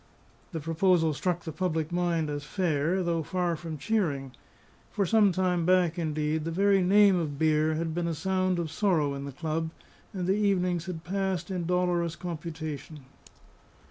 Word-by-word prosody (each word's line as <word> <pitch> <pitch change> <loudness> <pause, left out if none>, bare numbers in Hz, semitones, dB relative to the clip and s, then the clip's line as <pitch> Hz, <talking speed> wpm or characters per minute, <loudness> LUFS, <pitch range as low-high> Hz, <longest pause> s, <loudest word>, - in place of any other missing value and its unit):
The 165 - -3
proposal 165 +1 +2
struck 175 +5 -1
the 160 - -5
public 160 -2 -2
mind 175 -2 0
as 145 0 -4
fair, 170 +1 0
though 170 -1 0
far 175 +1 -1
from 160 -1 -6
cheering; 145 -8 -1 0.6
for 200 - 0
some 210 +1 +4
time 180 -1 +1
back, 180 -1 +3
indeed, 155 -1 -1
the 165 - -3
very 195 +3 +3
name 200 +1 +5
of 150 -4 -3
beer 155 0 +2
had 165 0 -2
been 170 0 -1
a 165 - -1
sound 185 +1 0
of 165 -3 -3
sorrow 160 -8 +1
in 140 0 -5
the 140 - -6
club, 160 +3 -2 0.4
and 185 -3 -3
the 190 - +2
evenings 180 -4 +1
had 165 -3 -5
passed 190 0 -2
in 175 -3 -2
dolorous 175 -2 +1
computation. 155 -3 -6
170 Hz, 170 wpm, -28 LUFS, 155-185 Hz, 0.6 s, name